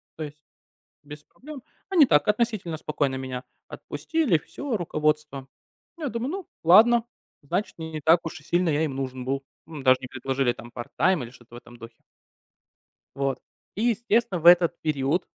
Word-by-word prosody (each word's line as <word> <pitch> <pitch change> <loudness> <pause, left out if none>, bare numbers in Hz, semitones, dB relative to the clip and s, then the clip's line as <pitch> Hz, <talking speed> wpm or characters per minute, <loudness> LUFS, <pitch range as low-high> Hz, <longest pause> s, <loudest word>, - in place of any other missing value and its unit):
то 160 - -5
есть 150 0 -9 0.6
без 150 +1 -11
проблем. 285 -2 -12 0.3
Они 340 -7 +6
так 150 -9 +3
относительно 210 -6 0
спокойно 145 -3 -1
меня 130 -1 -5 0.2
отпустили, 310 - -1
всё, 270 - -5
руководство. 150 -5 -1 0.5
Я 305 -4 -3
думаю: 235 +4 -3
"Ну, 385 0 -6 0.2
ладно, 225 +7 +6 0.4
значит, 175 +8 -3
не 160 -1 -7
не 155 -1 -5
так 165 +3 +5
уж 165 - -6
и - - -21
сильно 175 +2 +1
я 150 +1 +1
им 135 - -4
нужен 130 -1 -4
был". 135 +1 -2 0.2
Ну, 155 -3 -9
даже 130 -1 +5
не 130 - -6
предложили 130 0 -1
там 120 +1 -12
part 120 -1 -6
time 185 -7 +3
или 115 - -8
что-то 120 -2 -16
в - - -7
этом 120 0 -14
духе. 115 0 -13 1.1
Вот, 135 -1 -1 0.4
и, 215 - -2
естественно, 230 -5 +1
в 170 - -2
этот 175 -1 +6
период 150 +2 0
155 Hz, 175 wpm, -25 LUFS, 135-210 Hz, 1.1 s, Они